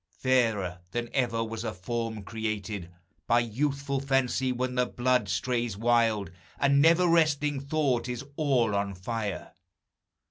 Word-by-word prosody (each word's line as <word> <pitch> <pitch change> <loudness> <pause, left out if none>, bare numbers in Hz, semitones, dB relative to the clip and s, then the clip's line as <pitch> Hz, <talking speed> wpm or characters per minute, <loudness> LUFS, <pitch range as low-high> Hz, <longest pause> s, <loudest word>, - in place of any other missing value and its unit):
Fairer 110 -9 +1
than 120 -1 -3
ever 120 -4 +1
was 115 0 -5
a 110 -4 -4
form 110 +2 -4
created 105 -4 -4 0.4
By 120 +1 +4
youthful 140 +4 -1
fancy 135 -1 +1
when 125 0 -2
the 125 0 +1
blood 125 -4 +1
strays 120 +2 -1
wild, 115 -4 +2 0.3
And 140 0 +4
never 165 +3 +5
resting 150 -4 +2
thought 140 -4 0
is 125 +2 -4
all 130 -8 +2
on 100 -1 -1
fire! 105 +2 -4
120 Hz, 135 wpm, -28 LUFS, 110-135 Hz, 0.4 s, never